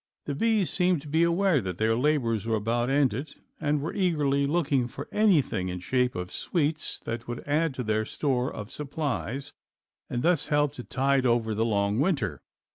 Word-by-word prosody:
The 145 - -2
bees 215 +3 +1
seemed 180 -5 +2
to - - -10
be 160 +3 +1
aware 170 -2 +3
that 90 -3 -5
their 110 +1 +2
labors 120 -5 +1
were 115 - +1
about 115 +3 0
ended 135 0 0 0.2
and 150 -2 0
were 160 - -3
eagerly 145 -7 +1
looking 140 -5 +1
for - - -8
anything 160 - +2
in 90 0 -4
shape 125 +7 0
of 90 0 -5
sweets 155 -2 0
that 115 +1 -5
would 120 +2 -6
add 150 0 +1
to 125 - -3
their 110 -1 0
store 130 -2 -1
of 105 +3 -7
supplies 140 -2 -3 0.6
and 120 0 -2
thus 165 -4 +3
help 145 -1 +2
to 125 - -8
tide 135 0 +1
over 115 -2 +1
the 110 +2 0
long 100 -1 +1
winter. 135 - 0
135 Hz, 185 wpm, -27 LUFS, 115-150 Hz, 0.6 s, aware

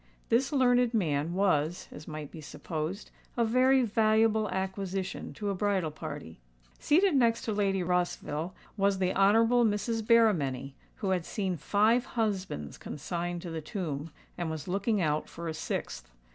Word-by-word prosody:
This 260 +4 +2
learned 245 -3 +3
man 160 -4 0
was, 175 -4 +1
as 150 - -10
might 155 -2 -6
be 160 - -9
supposed, 155 +6 -5 0.3
a 235 - +3
very 255 +3 +4
valuable 220 -1 +3
acquisition 190 0 -3
to 205 -2 -2
a - - -1
bridal 190 -4 0
party. 150 - -8 0.4
Seated 355 +2 +3
next 235 -3 +3
to 220 - -1
Lady 195 -2 +1
Rossville 175 -1 -1 0.2
was 200 0 +2
the 185 -1 +1
Honourable 225 +5 +4
Mrs. 225 +1 0
Berrymenny, 165 - +3 0.2
who 195 - -2
had 180 -2 +1
seen 190 0 -2
five 215 - +2
husbands 190 - -2
consigned 170 +3 -4
to 175 - -6
the 160 -1 -4
tomb, 155 -3 -4 0.3
and 170 -2 -1
was 155 -1 -5
looking 200 +3 0
out 150 -1 0
for 170 0 -7
a 160 - -2
sixth. 155 - -4
190 Hz, 155 wpm, -29 LUFS, 160-220 Hz, 0.4 s, very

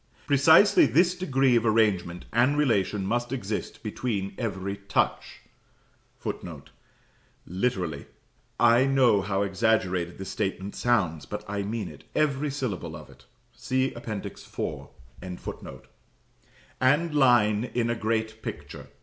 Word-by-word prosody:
Precisely 160 +8 +6
this 175 +9 +3
degree 135 -8 +2
of 115 - +3
arrangement 105 -6 +1
and 125 +6 +3
relation 105 -8 +1
must 120 +4 -1
exist 110 -6 -4
between 105 -3 -3
every 100 -4 -3
touch 100 0 -2 0.8
[Footnote: 80 -6 -7 0.7
Literally. 90 - -2 0.5
I 120 +2 +5
know 125 -7 +4
how 95 0 -1
exaggerated 95 -4 0
this 95 - -7
statement 95 +1 -3
sounds; 95 -11 0
but 105 0 -6
I 100 0 -2
mean 105 +2 -3
it, - - -13
every 150 -1 +1
syllable 130 - -4
of - - -11
it. - - -20 0.3
See 130 +1 -1
Appendix 110 -4 -6
IV.] - - -5 0.3
and 95 - -4
line 120 -6 +4
in 120 -2 -1
a - - 0
great 110 0 -2
picture. - - -8
110 Hz, 120 wpm, -26 LUFS, 95-130 Hz, 0.8 s, Precisely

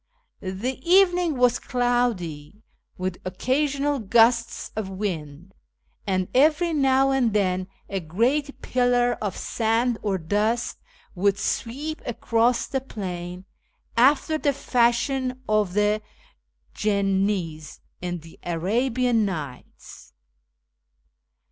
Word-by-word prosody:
The 200 +8 -4
evening 355 -5 +4
was 245 -1 +3
cloudy, 220 - -1 0.3
with 185 0 -3
occasional 275 +8 0
gusts 230 +2 +2
of 215 -3 -3
wind, 180 -3 -5 0.5
and 185 -2 0
every 310 +5 +3
now 270 -2 +3
and 250 -5 +2
then 185 -3 +1 0.2
a 195 - -2
great 245 - -1
pillar 245 -1 +2
of 205 -3 -3
sand 230 +1 0
or 200 -3 0
dust 210 +7 -1 0.4
would 200 +1 +1
sweep 280 +10 -3
across 235 0 +1
the 265 - -2
plain, 180 -6 -6 0.5
after 290 +5 +3
the 285 -2 +1
fashion 255 +1 0
of 210 -4 +1
the 210 +1 +2 0.7
jinnis 195 -6 -1 0.2
in 175 -2 -4
the 165 +1 -15
Arabian 230 +7 +1
Nights. 145 - -7
225 Hz, 100 wpm, -24 LUFS, 185-255 Hz, 0.7 s, evening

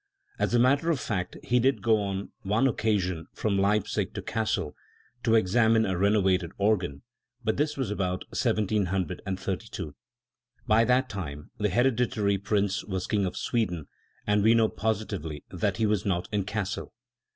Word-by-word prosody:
As - - +1
a - - +5
matter 140 +7 +3
of 160 -5 +2
fact 90 -6 -3
he 125 +1 +2
did 130 +3 +2
go 110 -2 +3
on 100 -1 -3
one 105 +6 +1
occasion 95 -9 0
from 100 -3 0
Leipzig 100 +1 +1
to - - -4
Cassel 110 -8 -1 0.5
to 115 -1 +3
examine 110 +2 +4
a 95 - -1
renovated 95 -2 +2
organ; 95 -8 0 0.4
but 110 -1 0
this 150 +1 0
was 130 -6 -2
about 90 -3 -1
1732. 95 -4 -1 0.7
By 115 -1 +4
that 125 +2 +3
time 75 - -6
the 105 0 +1
Hereditary 115 -2 +2
Prince 100 -1 0
was 95 -3 -3
King 100 -3 +1
of 90 - -5
Sweden, 90 - -1 0.4
and 105 0 +3
we 110 +3 +5
know 110 -1 +4
positively 100 -9 -3
that 95 +2 -1
he 110 - +2
was 105 -3 +1
not 90 -3 -1
in 100 -2 0
Cassel. 105 0 -4
105 Hz, 155 wpm, -28 LUFS, 95-110 Hz, 0.7 s, a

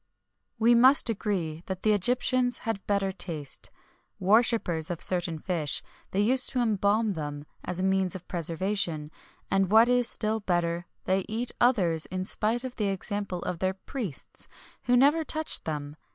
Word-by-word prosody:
We 230 +1 +4
must 255 +1 +6
agree 180 -7 -3
that 190 -1 -5
the 215 - +4
Egyptians 245 +4 +2
had 225 -3 -2
better 200 -1 +1
taste. 160 -7 -4 0.5
Worshippers 200 -5 +2
of 175 -2 -4
certain 175 -3 -1
fish, 155 -3 -2 0.3
they 195 - 0
used 250 +5 +6
to 255 - -2
embalm 215 -1 +1
them[XXI 145 -3 -5
3] - - -41 0.2
as 180 0 -2
a - - -1
means 190 -1 +1
of 180 -1 -9
preservation; 170 -2 -2 0.4
and 195 -1 +2
what 220 +3 +6
is 245 -1 +2
still 220 0 0
better, 175 -3 -1 0.2
they 190 +1 +1
eat 230 +3 -1
others 180 -10 +2
in 185 0 -4
spite 225 +5 0
of 255 -1 -7
the 210 -3 0
example 195 -1 -3
of 175 - -4
their 185 +1 0
priests, 195 - -7 0.4
who 245 0 +4
never 290 +5 +4
touched 315 0 -3
them. 150 -2 -4
195 Hz, 165 wpm, -27 LUFS, 175-230 Hz, 0.5 s, must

